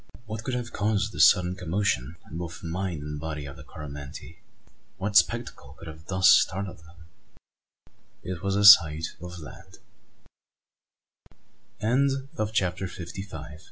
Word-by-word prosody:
What 110 0 -6
could 130 0 -2
have 120 -1 -5
caused 105 0 0
this - - +7
sudden 90 -2 +1
commotion 90 -5 -1
in 80 - -7
both 85 -1 -6
the - - -7
mind 85 -3 -3
and 75 0 -5
body 75 -2 -5
of 70 - -9
the - - -12
Coromantee? 70 -2 -9 0.6
What 100 +1 -3
spectacle 65 -7 +1
could 85 - -11
have 80 +1 -11
thus 95 -1 +3
startled 95 -1 +3
him? 85 +1 -18 1.2
It 90 -2 -5
was 100 0 -1
the 100 0 +2
sight 80 -6 +7
of 90 0 -8
land! 95 +4 -12 2.7
CHAPTER 95 -3 -1
FIFTY 90 +1 -7
SIX. 80 -5 -9
90 Hz, 140 wpm, -26 LUFS, 80-100 Hz, 2.7 s, this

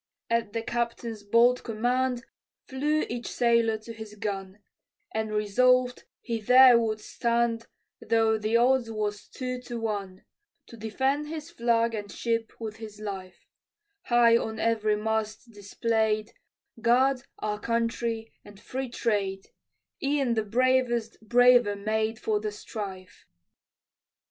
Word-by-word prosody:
At 230 -3 0
the 230 - -2
captain's 235 -2 -3
bold 235 +4 +3
command, 245 +2 -1 0.4
Flew 295 +4 0
each 240 0 -5
sailor 235 -2 +2
to 225 +2 -10
his 220 -2 -10
gun, 195 -2 -4 0.6
And 220 0 -2
resolved 250 +4 +2 0.2
he 230 -2 -3
there 250 +2 +7
would 220 -2 -1
stand, 235 +1 -1 0.3
Though 225 -1 +2
the 215 +2 +2
odds 245 0 +3
was 210 -2 -3
two 255 -1 -5
to 240 -1 -6
one, 200 -4 -4 0.4
To - - -11
defend 265 +7 -1
his 315 +1 -7
flag 235 -4 +1
and 205 -2 -5
ship 230 -1 -2
with 220 -2 -6
his 215 -2 -10
life: 190 -4 -7 0.6
High 240 -1 +5
on 220 -1 -4
every 215 -2 +1
mast 220 +2 -3
display'd, 215 +1 -1 0.5
"God, 255 +3 +3 0.2
Our 210 -1 -3
Country, 230 0 -2
and 205 -1 -14
Free 260 +4 -5
Trade," 200 -5 -2 0.5
E'en 275 -3 +1
the 220 -1 0
bravest 240 0 +1
braver 240 -1 +5
made 220 +2 -1
For 215 -1 0
the 210 0 -3
strife. 195 -2 -8
230 Hz, 130 wpm, -27 LUFS, 215-240 Hz, 0.6 s, there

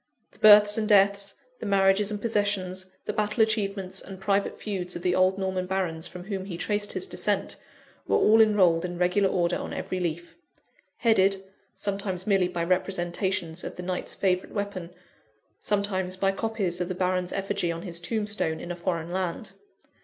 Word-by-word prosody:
The - - -22
births 210 0 +8
and 215 0 -1
deaths, 200 -1 +4 0.2
the 220 - -5
marriages 195 +1 +3
and 210 -1 -3
possessions, 200 -4 -1 0.2
the - - -2
battle 210 +2 +2
achievements 195 -3 -1
and 190 -1 -10
private 200 0 0
feuds 185 -4 -3
of 175 - -6
the 180 -1 +2
old 185 +1 +3
Norman 190 -1 -2
barons 180 -4 -2
from 180 0 -9
whom 195 -1 -4
he 180 -4 -6
traced 205 +2 0
his 375 - -2
descent, - - -1 0.5
were - - +3
all 220 +1 +6
enrolled 185 -6 +4
in 175 -1 -4
regular 180 +2 +2
order 175 -1 +1
on - - -6
every 185 - -3
leaf 170 -1 -4 0.6
headed, 195 -4 +3 0.3
sometimes 195 -2 -3
merely 195 -3 +3
by 175 -2 -3
representations 175 -1 -1
of - - -6
the 180 - -7
Knight's 180 0 -4
favourite 185 +1 0
weapon; 200 -4 -4 0.7
sometimes 190 -3 -1
by 195 +1 +2
copies 195 -4 -2
of 180 - -1
the 185 - -4
Baron's 180 0 0
effigy 195 -3 -1
on 165 +1 -6
his 170 -3 -4
tombstone 205 -4 -2
in 175 - -6
a - - -3
foreign 170 -1 -3
land. 185 +3 -3
190 Hz, 175 wpm, -26 LUFS, 180-205 Hz, 0.7 s, births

